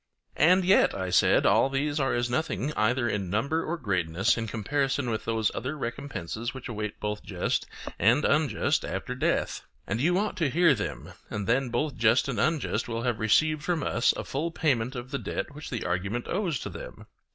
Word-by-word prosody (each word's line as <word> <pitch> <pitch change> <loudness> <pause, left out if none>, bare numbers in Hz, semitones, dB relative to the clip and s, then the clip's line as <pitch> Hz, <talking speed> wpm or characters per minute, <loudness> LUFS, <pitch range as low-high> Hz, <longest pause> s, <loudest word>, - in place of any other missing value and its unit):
And 180 +4 +5
yet, 190 +2 +4
I 95 -2 -3
said, - - +4
all 135 - +4
these 145 +2 -1
are 135 -1 +1
as 120 0 0
nothing 130 - -1
either 120 +2 +1
in 100 -4 -2
number 140 - 0
or 170 +2 -3
greatness 95 - +1
in 115 -1 -3
comparison 135 +4 -1
with 110 - -3
those 110 -1 +1
other 140 +4 -4
recompenses 120 - -5
which 130 - -7
await 105 -3 -5
both 105 0 -3
just 90 -3 -2 0.3
and 120 +8 +4
unjust 150 -8 +2
after - - -4
death. - - 0 0.2
And 115 - -2
you 175 +5 +3
ought 210 +1 -1
to 160 -6 +1
hear 170 +2 +4
them, 105 - -5 0.2
and 105 -1 -3
then 125 +3 +1
both 140 +2 -1
just 115 +3 +3
and 130 -4 -2
unjust 155 -8 0
will 115 0 -3
have 120 -3 -1
received 155 +8 +3
from 165 -1 -1
us 115 - +2
a - - -3
full 155 +5 -2
payment 135 -6 0
of 125 +1 -7
the 140 - -2
debt - - -4
which 150 +1 -8
the 120 - -4
argument 100 +7 -2
owes 180 -6 -1
to - - -5
them. - - -9
125 Hz, 195 wpm, -27 LUFS, 110-150 Hz, 0.3 s, And